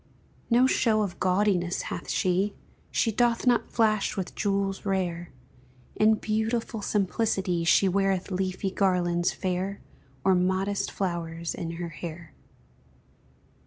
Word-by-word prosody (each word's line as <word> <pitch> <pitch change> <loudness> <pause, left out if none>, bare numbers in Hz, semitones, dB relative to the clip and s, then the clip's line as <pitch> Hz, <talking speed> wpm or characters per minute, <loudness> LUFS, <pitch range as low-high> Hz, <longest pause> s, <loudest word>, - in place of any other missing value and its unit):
No 245 +2 +5
show 225 -4 +2
of 190 -3 -5
gaudiness 185 -2 +1
hath - - -6
she, 190 +3 +1 0.3
She 225 - +1
doth 235 +2 +1
not 245 -2 +3
flash 215 -3 +1
with 190 -2 -3
jewels 195 -1 -1
rare; 175 -3 -2 0.7
In 215 +1 +4
beautiful 220 +1 -2
simplicity 195 -3 0
She 195 +3 +5
weareth 195 0 0
leafy 190 +1 -2
garlands 180 -3 +1
fair, 190 +1 -3 0.4
Or 190 - +4
modest 190 +2 0
flowers 170 -3 -3
in 170 -3 -5
her 170 0 -5
hair. 165 0 -8
190 Hz, 120 wpm, -27 LUFS, 180-210 Hz, 0.7 s, No